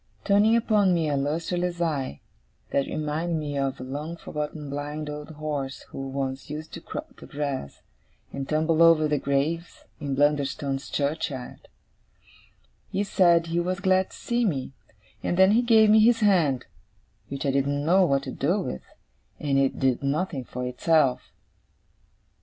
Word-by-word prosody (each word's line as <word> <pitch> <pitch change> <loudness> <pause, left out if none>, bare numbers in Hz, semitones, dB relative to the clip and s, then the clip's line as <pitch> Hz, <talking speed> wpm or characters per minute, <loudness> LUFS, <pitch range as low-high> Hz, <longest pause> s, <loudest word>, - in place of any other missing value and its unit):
Turning 210 +3 +4
upon 210 -5 +3
me 165 -2 0
a 145 - 0
lustreless 170 +5 -1
eye, 140 - -2 0.5
that 140 - +1
reminded 155 +2 -2
me 150 -2 -4
of 135 -1 -1
a - - -6
long 150 +6 -5
forgotten 150 -1 -5
blind 145 +2 -4
old 150 +1 -7
horse 145 -3 -4
who 135 0 -6
once 135 +1 -4
used 155 +1 -7
to - - -7
crop - - -7
the - - -12
grass, 140 - -4 0.5
and 135 -1 -5
tumble 155 +1 +2
over 165 -2 +6
the 150 -1 0
graves, 150 +6 -2 0.2
in 140 -3 -2
Blunderstone 140 -1 +1
churchyard, 140 -2 -3 1.2
he 200 - 0
said 175 -4 +4
he 165 +1 -1
was 180 +2 -1
glad 190 -1 +2
to - - -12
see 240 0 -1
me: 140 - -1 0.5
and 175 - -1
then 190 +1 +6
he 230 +3 +4
gave 220 -3 +5
me 220 - +7
his 230 +1 +4
hand; 165 - +3 0.6
which 140 +1 -4
I 140 - +2
didn't 140 +1 0
know 185 +4 +5
what 140 -5 +2
to 130 - -5
do 170 +12 0
with, 65 - -4 0.6
as 140 -2 0
it 135 -1 +2
did 130 -2 +1
nothing 145 -1 -1
for 125 +1 -5
itself. 130 +1 +1
150 Hz, 160 wpm, -26 LUFS, 140-175 Hz, 1.2 s, me